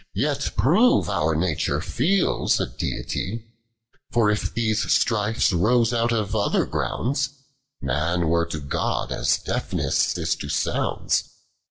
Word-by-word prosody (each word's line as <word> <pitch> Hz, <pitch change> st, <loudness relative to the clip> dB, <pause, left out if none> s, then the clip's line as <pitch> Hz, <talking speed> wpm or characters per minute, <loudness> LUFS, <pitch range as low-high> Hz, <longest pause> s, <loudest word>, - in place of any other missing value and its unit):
Yet -, -, -1 dB
prove 180 Hz, -, +4 dB
our 80 Hz, +1 st, +1 dB
nature 80 Hz, -2 st, 0 dB
feels 175 Hz, +8 st, +1 dB
a -, -, +1 dB
Deity; 110 Hz, +5 st, -4 dB, 0.7 s
For 115 Hz, -3 st, +3 dB
if 105 Hz, -, -1 dB
these 110 Hz, -2 st, 0 dB
strifes 105 Hz, -2 st, +2 dB
rose 115 Hz, +6 st, +3 dB
out 120 Hz, 0 st, +1 dB
of 110 Hz, -4 st, -1 dB
other -, -, +1 dB
groundsi 135 Hz, +2 st, -1 dB, 0.5 s
Man 85 Hz, +3 st, 0 dB
were 85 Hz, +1 st, +2 dB
to 80 Hz, -2 st, -4 dB
God, 70 Hz, -1 st, -2 dB
as -, -, +1 dB
deafness -, -, -1 dB
is 80 Hz, -1 st, 0 dB
to 70 Hz, -, -6 dB
sounds. 75 Hz, -, 0 dB
105 Hz, 130 wpm, -23 LUFS, 85-120 Hz, 0.7 s, prove